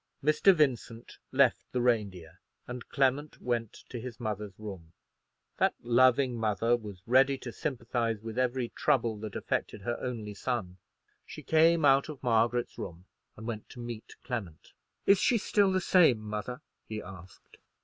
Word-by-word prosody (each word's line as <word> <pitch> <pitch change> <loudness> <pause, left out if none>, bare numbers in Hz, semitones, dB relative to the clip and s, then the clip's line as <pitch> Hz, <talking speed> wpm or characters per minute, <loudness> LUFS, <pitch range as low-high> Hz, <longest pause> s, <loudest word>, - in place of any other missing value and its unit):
Mr. 155 +6 +5
Vincent 125 -8 -1
left 130 -2 +3
the 125 - -1
Reindeer, 100 -8 -1 0.3
and 125 -1 -8
Clement 140 +2 0
went 120 -3 -1 0.2
to 120 - -6
his 120 -1 -8
mother's 105 -4 -4
room. 95 -6 -9 0.6
That - - +2
loving 130 +2 +4
mother 115 +1 +2
was 105 -6 -9
ready 135 +3 +4
to 125 -2 -7
sympathize 120 -5 -2
with 110 +1 -7
every 125 -1 0
trouble 115 -4 +1
that 105 -1 -7
affected 100 - -3
her 120 +3 -2
only 115 -5 -4
son. 100 -5 -3 0.5
She - - -9
came 160 0 +4
out 135 +1 +4
of 145 -3 -9
Margaret's 120 0 +1
room 85 +1 -7 0.3
and 110 - -9
went 110 -2 -5
to 125 - -11
meet 120 -2 -7
Clement. 100 - -6 0.3
"Is 200 -1 +6
she 240 - +3
still 205 -2 +2
the 185 - +2
same, 175 -9 +5
mother?" 105 +3 -5 0.3
he 110 -1 -4
asked. 95 -4 -13
120 Hz, 155 wpm, -30 LUFS, 105-130 Hz, 0.6 s, Is